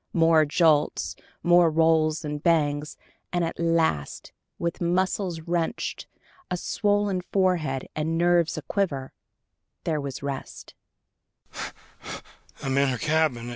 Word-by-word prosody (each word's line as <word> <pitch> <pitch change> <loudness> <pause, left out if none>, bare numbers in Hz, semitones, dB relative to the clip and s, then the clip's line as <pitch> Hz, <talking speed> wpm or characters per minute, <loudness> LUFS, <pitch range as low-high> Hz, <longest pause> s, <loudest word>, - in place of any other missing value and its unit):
More 165 -2 +5
jolts, 155 -1 +2 0.3
more 175 0 +6
rolls 160 0 +2
and 150 0 -4
bangs, 150 -3 +1 0.3
and 175 -1 +1
at 165 - -5
last, 165 - 0 0.3
with 170 0 -3
muscles 180 0 0
wrenched, 170 0 -2 0.4
a 180 - -1
swollen 205 0 0
forehead 170 -9 +1
and 160 +1 -1
nerves 175 -1 +3
aquiver, 145 -3 -2 0.7
there 155 -3 -1
was 140 -1 -6
rest. 140 -1 -6
165 Hz, 95 wpm, -26 LUFS, 150-175 Hz, 0.7 s, more